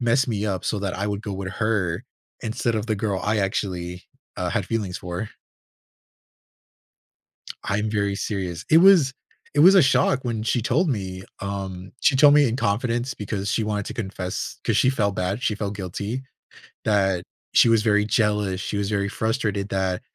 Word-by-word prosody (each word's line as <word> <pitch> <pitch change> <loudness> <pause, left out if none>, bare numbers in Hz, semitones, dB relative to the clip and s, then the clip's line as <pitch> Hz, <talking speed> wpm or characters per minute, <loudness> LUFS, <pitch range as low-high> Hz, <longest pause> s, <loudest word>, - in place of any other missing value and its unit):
mess 120 +3 +2
me 105 -2 -1
up 95 -3 -2
so 105 - -1
that 100 -3 -2
I 100 - -1
would 100 +1 -3
go 100 - -4
with 95 -1 -4
her 105 -3 -1 0.4
instead 115 +1 -1
of 110 +1 -2
the 110 -2 0
girl 100 -3 -1
I 105 +1 +1
actually, 90 -2 -2 0.3
uh, - - -2
had - - -1
feelings 100 -5 -2
for. 90 +4 -5 2.3
I'm 105 +2 -1
very 100 -2 0
serious. 95 -5 -3
It 160 - +7
was 170 -8 +6 0.4
it - - +2
was 185 +6 +8
a 190 - +8
shock 130 0 +3
when 115 -3 -2
she 115 +1 0
told 155 +8 +2
me, 95 -6 -3 0.2
um, 95 -2 -5
she 150 - +4
told 145 +1 +7
me 145 -3 +6
in 115 - -1
confidence 120 +2 -1
because 100 0 -3
she 110 - +1
wanted 105 -1 -2
to - - -5
confess, 95 -4 -4
'cause - - +1
she 130 - +4
felt 100 -7 0
bad, 95 +7 -2
she 105 - +1
felt 100 -1 -4
guilty 100 +6 -4 0.6
that 95 -4 +2 0.3
she 115 - +6
was 115 -1 +4
very 105 -2 +3
jealous, 105 -4 +1
she 100 - -4
was 100 0 -1
very 100 -1 0
frustrated 105 -2 -1
that 95 -1 -1
105 Hz, 180 wpm, -24 LUFS, 95-115 Hz, 2.3 s, was